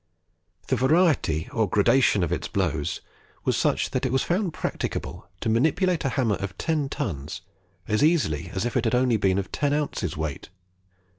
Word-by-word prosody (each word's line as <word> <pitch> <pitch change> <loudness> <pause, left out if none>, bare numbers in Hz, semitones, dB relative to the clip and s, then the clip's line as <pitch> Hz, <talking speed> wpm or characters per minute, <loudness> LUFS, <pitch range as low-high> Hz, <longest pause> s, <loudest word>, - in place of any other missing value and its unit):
The 130 - +3
variety 130 - +2
or 110 -4 +1
gradation 105 0 +3
of 85 - -1
its 90 - -2
blows 80 -7 -1 0.4
was - - +2
such, - - +1
that 130 - -1
it 130 - 0
was 130 0 +2
found 180 +1 0
practicable - - -4
to - - -2
manipulate 160 - +2
a 135 - +1
hammer 120 -6 +1
of 95 -2 -6
ten 155 -4 -1
tons 75 - -4 0.5
as 105 +5 +1
easily 100 - +2
as 95 +4 -2
if 120 - -3
it 125 -2 +1
had 115 - +2
only 125 -2 +3
been 95 -2 +2
of 95 -2 -3
ten 145 -1 0
ounces 90 - -2
weight. 80 -3 -4
115 Hz, 175 wpm, -25 LUFS, 95-145 Hz, 0.5 s, The